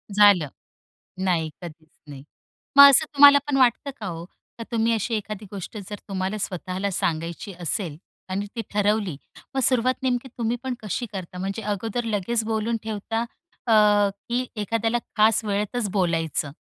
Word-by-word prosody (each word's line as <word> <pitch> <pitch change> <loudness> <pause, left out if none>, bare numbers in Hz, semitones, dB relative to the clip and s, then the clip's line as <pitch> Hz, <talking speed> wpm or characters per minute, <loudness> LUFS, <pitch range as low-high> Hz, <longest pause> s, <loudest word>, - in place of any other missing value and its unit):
झालं. 200 -7 +6 0.8
नाही, 165 -4 +1
कधीच 160 -2 -11 0.2
नाही. 140 -1 -10 0.5
मग 280 0 +12
असं 295 +3 +6
तुम्हाला 285 0 +8
पण 275 -2 +1
वाटतं 255 +2 +2
का - - -6
हो? 170 -1 -6 0.3
का 230 - -6
तुम्ही 230 0 +1
अशी 225 +1 -1
एखादी 210 0 -5
गोष्ट 200 +2 -7
जर 205 - -4
तुम्हाला 190 +2 -2
स्वतःला 190 +1 -3
सांगायची 170 +3 -3
असेल 170 -2 -2 0.3
आणि 195 +2 -2
ती 230 - -2
ठरवली 205 -4 +1 0.4
मग - - +1
सुरुवात 255 +1 +1
नेमकी 250 0 0
तुम्ही 235 0 -1
पण 260 -1 -2
कशी 215 +4 -3
करता? 180 -2 -7
म्हणजे 195 +4 -4
अगोदर 215 +3 -3
लगेच 220 +2 -1
बोलून 225 +1 -1
ठेवता 220 +1 -3 0.4
अ, - - +2 0.6
की 245 +2 0
एखाद्याला 225 +2 0 0.2
खास 220 0 +4
वेळेतच 210 +2 -1
बोलायचं? 165 -6 0
210 Hz, 150 wpm, -24 LUFS, 185-230 Hz, 0.8 s, मग